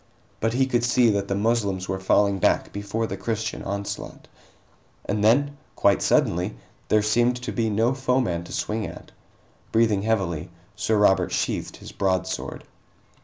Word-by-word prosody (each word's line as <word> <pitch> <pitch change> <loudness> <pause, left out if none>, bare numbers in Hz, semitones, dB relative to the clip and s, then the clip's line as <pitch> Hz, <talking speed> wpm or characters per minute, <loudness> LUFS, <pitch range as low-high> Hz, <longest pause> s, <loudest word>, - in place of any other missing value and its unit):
But 115 +1 0
he 130 +2 +3
could 120 -3 0
see 120 -1 +4
that 100 -1 -1
the 100 - -1
Moslems 100 -3 0
were 95 - -2
falling 100 +1 +2
back - - +1
before 100 +3 -2
the 95 - -4
Christian 110 +2 -3
onslaught. 100 +1 -5 0.8
And 105 0 -1
then, 140 +6 +3 0.2
quite 100 -1 +3
suddenly, 90 +5 +1 0.3
there 110 -1 +3
seemed 120 +3 +2
to - - -3
be 115 -2 0
no 110 +4 +2
foeman 125 -10 0
to - - -11
swing 110 -1 -2
at. - - -11 0.6
Breathing 110 -3 +3
heavily, 95 -6 -1 0.3
Sir 110 0 0
Robert 105 -2 +3
sheathed - - -2
his - - -11
broadsword. 95 -1 -2
105 Hz, 155 wpm, -24 LUFS, 100-115 Hz, 0.8 s, see